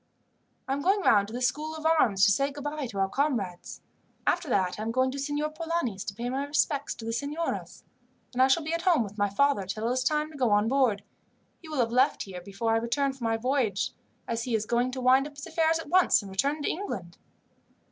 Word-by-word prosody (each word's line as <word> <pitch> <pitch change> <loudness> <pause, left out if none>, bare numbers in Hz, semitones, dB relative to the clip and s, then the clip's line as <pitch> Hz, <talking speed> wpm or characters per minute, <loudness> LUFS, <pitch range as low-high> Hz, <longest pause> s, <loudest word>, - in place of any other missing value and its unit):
"I 265 - 0
am 280 - -2
going 390 +6 +2
round 205 - +4
to 220 - -10
the 250 - -3
School 310 +5 -1
of 315 0 -8
Arms, 235 -12 +4
to 205 - +5
say 275 +7 +1
goodbye 290 0 -4
to 215 -4 -8
our 195 0 +2
comrades. 210 -8 -2 0.4
After 310 - +1
that 190 -4 +1
I - - -3
am 220 - -2
going 260 +2 +1
to 280 - -5
Signor 290 +2 -2
Polani's 315 - -2
to 195 - -5
pay 235 +3 -4
my 265 +3 -1
respects 285 0 0
to 225 - -9
the 230 - -2
signoras. 290 +7 -4 0.5
Then 255 - 0
I 260 - +7
shall 285 +5 +3
be 320 +2 -3
at 335 - -1
home 340 -9 +3
with 210 0 -9
my 205 0 +2
father 205 -2 +1
till 215 +4 -3
it - - +1
is 255 0 0
time 305 +3 0
to 300 - -11
go 250 -3 +3
on 205 +1 +3
board. 240 -6 +2 0.6
He 325 - -12
will 305 - -4
have 235 -2 +1
left 250 +2 +2
here 185 -2 -8
before 200 +5 -2
I 225 - +3
return 270 +4 0
from 260 -3 -7
my 225 0 +1
voyage, 235 -4 0 0.4
as 230 0 -2
he 245 -3 0
is 215 -1 -1
going 240 +2 +1
to 260 - -4
wind 260 +3 +4
up 295 - -14
his 285 - -8
affairs 325 -1 +1
at 325 - -7
once 365 - +4
and 195 - -9
return 280 +10 0
to - - -1
England." 190 - -5
260 Hz, 245 wpm, -28 LUFS, 220-295 Hz, 0.6 s, I